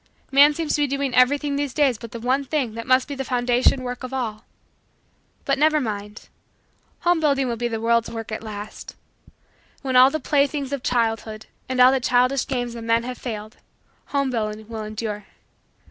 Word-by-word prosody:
Man 285 +2 +6
seems 320 -1 -2
to 295 - +1
be 290 - +3
doing 275 -1 -2
everything 280 +3 +3
these 285 -3 -3
days 270 -7 +2
but 230 - -8
the 235 - -6
one 255 +4 +1
thing 270 -5 -2
that 230 0 -7
must 255 0 +3
be 285 - -5
the 270 -1 -4
foundation 250 +1 +2
work 250 0 -5
of 255 0 -6
all. 230 -4 -4 1.0
But - - +1
never 310 0 +4
mind 210 -4 -5 0.7
homebuilding 300 -6 +2
will 235 - -1
be 240 +1 -2
the 225 -1 -3
world's 230 0 +1
work 225 -1 -7
at 215 - -3
the - - -13
last. 210 0 -8 0.9
When 260 -2 -2
all 255 +1 +8
the 310 - -3
playthings 280 -1 0
of 280 - -2
childhood 225 -3 -1 0.2
and 255 -1 -2
all 250 +1 +8
the 265 - +2
childish 250 +2 +2
games 245 -3 -2
of 230 -1 -7
men 230 +1 +2
have 250 0 -6
failed, 215 -2 -6 0.5
homebuilding 225 -6 -2
will 220 -1 -5
endure. 215 -1 -5
250 Hz, 190 wpm, -23 LUFS, 225-275 Hz, 1.0 s, all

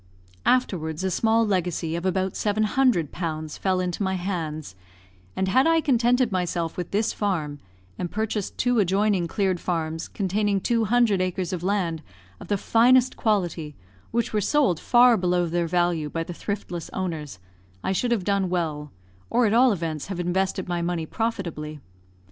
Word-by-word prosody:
Afterwards 175 -10 +1
a 190 - 0
small 225 +4 +2
legacy 175 -5 -1
of 170 +2 -2
about 190 0 0
700 215 - +1
pounds 155 -3 -4
fell 185 -1 +1
into 180 +1 -2
my 190 -1 0
hands, 160 - -4 0.6
and 190 - 0
had 260 +10 +4
I 330 0 +4
contented 250 -4 +2
myself 175 -3 -1
with 180 -2 -4
this 215 +2 0
farm, 155 -8 -2 0.4
and 175 - -2
purchased 215 -1 -3
two 245 -1 +2
adjoining 195 -1 +2
cleared 190 -1 0
farms 165 -2 -2
containing 200 +1 0
two 230 +3 +1
hundred 225 -4 +3
acres 185 0 -2
of 180 - -3
land 180 -4 -1 0.4
of - - -10
the 205 - +1
finest 250 +5 +4
quality 175 -8 -1 0.3
which 235 0 -1
were 210 - +1
sold 200 - +2
far 245 -1 +5
below 180 -1 +1
their 170 0 -1
value 175 -3 +1
by 165 +2 -2
the 175 - -7
thriftless 175 -3 -5
owners, 160 - -4 0.5
I - - 0
should 240 +6 0
have 225 -6 +1
done 200 -1 +1
well, 155 -5 -2 0.4
or 240 +1 +3
at 210 - +2
all 250 +2 +6
events 165 -6 -3
have 190 -3 -5
invested 190 +2 -1
my 175 -1 -1
money 170 -1 -2
profitably. 165 -8 -3
185 Hz, 165 wpm, -25 LUFS, 170-215 Hz, 0.6 s, all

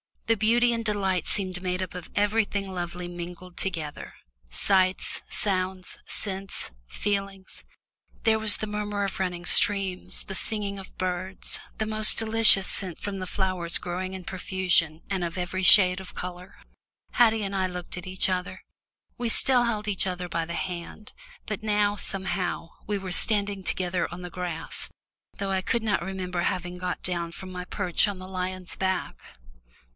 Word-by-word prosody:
The 225 -1 +2
beauty 235 +3 +3
and 230 -1 -1
delight 195 -4 0
seemed 185 -3 -2
made 180 0 -2
up 185 - -7
of 180 -2 -8
everything 205 -1 +1
lovely 175 -1 -4
mingled 175 +1 -8
together 160 -6 -4 0.4
sights, 185 - +1
sounds, 185 -2 -2
scents, 195 - -4 0.2
feelings. 195 - -3 0.6
There 220 -1 +3
was 220 -1 +6
the - - -3
murmur 210 -1 -2
of 195 -2 -3
running 180 -2 -2
streams, 195 -2 +3
the 195 - -7
singing 200 0 -1
of 190 - -12
birds, 185 +1 -3 0.2
the 215 - -1
most 215 0 +3
delicious 220 -3 +8
scent 185 -4 +2
from 200 -1 -5
the 185 - -4
flowers 185 -3 0
growing 185 +2 -4
in 190 -1 -6
profusion 180 -4 0
and 190 -2 -1
of 170 +1 -4
every 180 +1 -2
shade 185 -2 +9
of 190 - -11
colour. 180 +1 -7 0.6
Haddie 225 -3 +4
and 195 0 -3
I 190 -1 +1
looked 180 -1 -6
at 180 - -7
each 185 +1 +2
other 180 -1 -3 0.6
we 240 -1 0
still 245 +1 +5
held 215 -3 -2
each 195 -2 +1
other 180 -1 -4
by 165 -1 -1
the 170 +1 -5
hand, 180 +4 -6 0.3
but 210 - -4
now, 210 -1 +1
somehow, 185 -4 -3 0.2
we 205 0 0
were 190 -2 -6
standing 200 0 +1
together 180 0 0
on 175 +1 -7
the 180 - -7
grass, 175 -2 -3 0.5
though 195 -1 -2
I 190 -1 +1
could 235 +4 0
not 215 -5 +1
remember 180 -1 -3
having 180 0 -2
got 180 0 -3
down 170 -2 -3
from 185 +2 -9
my 180 0 -6
perch 180 0 +1
on 200 -2 -4
the 185 0 -9
lion's 185 -1 -5
back. 190 -1 -2
190 Hz, 165 wpm, -26 LUFS, 180-205 Hz, 0.6 s, shade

